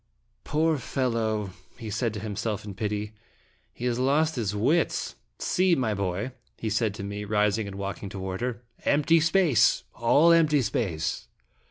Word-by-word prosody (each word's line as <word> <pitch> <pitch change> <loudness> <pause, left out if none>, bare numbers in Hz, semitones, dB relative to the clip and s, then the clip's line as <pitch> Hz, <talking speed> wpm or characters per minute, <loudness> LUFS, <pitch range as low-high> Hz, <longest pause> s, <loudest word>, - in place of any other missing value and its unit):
" - - -44
Poor 155 0 +1
fellow! 115 -6 -1
" - - -31
he 110 -3 -6
said 115 +2 0
to - - -4
himself 105 0 -3
in 100 - -6
pity. 105 +1 -3 0.6
"He 120 - -7
has 120 -1 0
lost 150 +5 +2
his 105 -5 -2
wits! 145 +11 +1 0.2
See, 185 -1 +2
my 125 -7 0
boy," 100 +4 -2 0.3
he 110 - -3
said 110 -1 0
to 100 - -6
me, 100 +1 -5
rising 105 0 +1
and 100 - -7
walking 100 0 -5
toward 95 +1 -5
her. 120 -1 -3
" - - -30
Empty 150 +3 +4
space, 165 - +3
all 145 +8 +4
empty 155 -4 +4
space." 95 -7 -2
110 Hz, 170 wpm, -27 LUFS, 105-140 Hz, 0.6 s, Empty